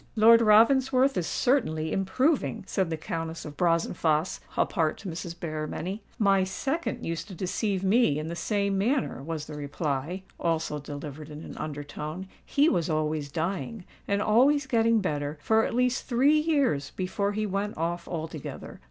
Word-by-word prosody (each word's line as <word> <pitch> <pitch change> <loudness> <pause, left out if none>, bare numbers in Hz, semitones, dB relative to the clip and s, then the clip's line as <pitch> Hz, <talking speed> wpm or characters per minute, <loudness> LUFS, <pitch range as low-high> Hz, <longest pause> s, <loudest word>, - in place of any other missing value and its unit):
"Lord 230 +1 +7
Ravensworth 255 +5 +5
is 175 - -1
certainly 160 - +1
improving," 195 - +1
said 190 -3 -1
the 160 - -2
Countess 165 -1 -5
of 150 -1 -8
Brazenphace 165 -1 +1 0.2
apart 160 -5 +1
to 210 - -9
Mrs. 170 0 -5
Berrymenny. 160 +5 -4 0.2
"My 195 -3 +4
second 275 - -2
used 165 +3 -3
to 190 - -9
deceive 190 +2 -1
me 195 - +3
in 155 - -3
the 170 +1 -4
same 200 +1 0
manner," 250 - 0
was 155 +1 -4
the 150 - -9
reply, 150 +4 -3 0.2
also 165 -3 -1
delivered 145 +1 -7
in 150 +1 -8
an - - -9
under 145 -1 -5
tone. 155 +5 -6 0.2
"He 290 +2 +3
was 175 - +1
always 155 -2 -1
dying—and 195 +4 -3
always 265 +6 +4
getting 230 -3 +3
better, 150 -4 -2
for 220 +8 +3
at - - -3
least 250 0 +1
three 275 +5 +4
years 280 - +1
before 200 +2 -1
he 215 +1 -1
went 200 +1 -2
off 170 +2 -2
altogether. 160 -3 -6
185 Hz, 160 wpm, -27 LUFS, 155-225 Hz, 0.2 s, Lord